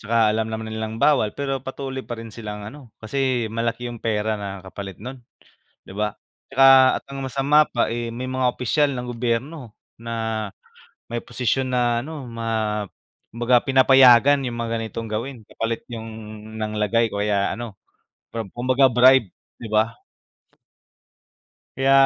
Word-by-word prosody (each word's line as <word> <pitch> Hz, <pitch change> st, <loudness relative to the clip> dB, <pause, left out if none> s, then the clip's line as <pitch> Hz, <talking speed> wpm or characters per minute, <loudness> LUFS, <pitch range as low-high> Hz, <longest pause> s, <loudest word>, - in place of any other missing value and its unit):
Tsaka 110 Hz, -1 st, +2 dB
alam 110 Hz, 0 st, -1 dB
naman 110 Hz, 0 st, -5 dB
nilang 110 Hz, 0 st, -4 dB
bawal, 115 Hz, -5 st, +2 dB
pero 135 Hz, -2 st, -2 dB
patuloy 135 Hz, 0 st, -5 dB
pa 120 Hz, -2 st, -7 dB
rin 115 Hz, -1 st, -9 dB
silang 105 Hz, -2 st, -7 dB
ano, 130 Hz, +3 st, -10 dB
kasi 125 Hz, 0 st, -1 dB
malaki 115 Hz, +1 st, -2 dB
'yung 120 Hz, -2 st, -6 dB
pera 110 Hz, -1 st, 0 dB
na 95 Hz, -2 st, -6 dB
kapalit 95 Hz, -1 st, -8 dB
nun, 125 Hz, +4 st, -9 dB, 0.6 s
'di -, -, -13 dB
ba? 105 Hz, -1 st, -1 dB, 0.3 s
Tsaka 135 Hz, -1 st, +6 dB
at -, -, -69 dB
ang 135 Hz, -1 st, -5 dB
masama 140 Hz, +4 st, +3 dB
pa, 120 Hz, -, 0 dB
eh, 115 Hz, 0 st, -3 dB
may 130 Hz, +2 st, -4 dB
mga 130 Hz, 0 st, 0 dB
opisyal 140 Hz, +3 st, +1 dB
ng 125 Hz, -1 st, -4 dB
gobyerno 125 Hz, +1 st, -2 dB, 0.2 s
na 110 Hz, -2 st, -3 dB, 0.7 s
may 120 Hz, -, -1 dB
posisyon 130 Hz, +2 st, -1 dB
na 120 Hz, -1 st, +1 dB
ano 145 Hz, +1 st, -7 dB
ma 115 Hz, -1 st, -7 dB, 0.9 s
kumbaga 120 Hz, +1 st, +4 dB
pinapayagan 130 Hz, 0 st, +6 dB
'yung 120 Hz, -, -5 dB
mga 115 Hz, -1 st, -2 dB
ganitong 115 Hz, 0 st, -5 dB
gawin 115 Hz, +1 st, -4 dB
kapalit 115 Hz, +2 st, -4 dB
'yung 115 Hz, -1 st, -6 dB, 0.5 s
nang 110 Hz, -1 st, -3 dB
lagay 115 Hz, +2 st, +2 dB
kaya 100 Hz, -1 st, 0 dB
ano, 115 Hz, -4 st, -7 dB, 0.8 s
kumbaga 130 Hz, +2 st, +3 dB
bribe, 125 Hz, -4 st, +5 dB, 0.3 s
'di 110 Hz, -, -7 dB
ba? 110 Hz, +1 st, +2 dB, 1.8 s
Kaya 135 Hz, +1 st, +3 dB
120 Hz, 145 wpm, -23 LUFS, 110-130 Hz, 1.8 s, Tsaka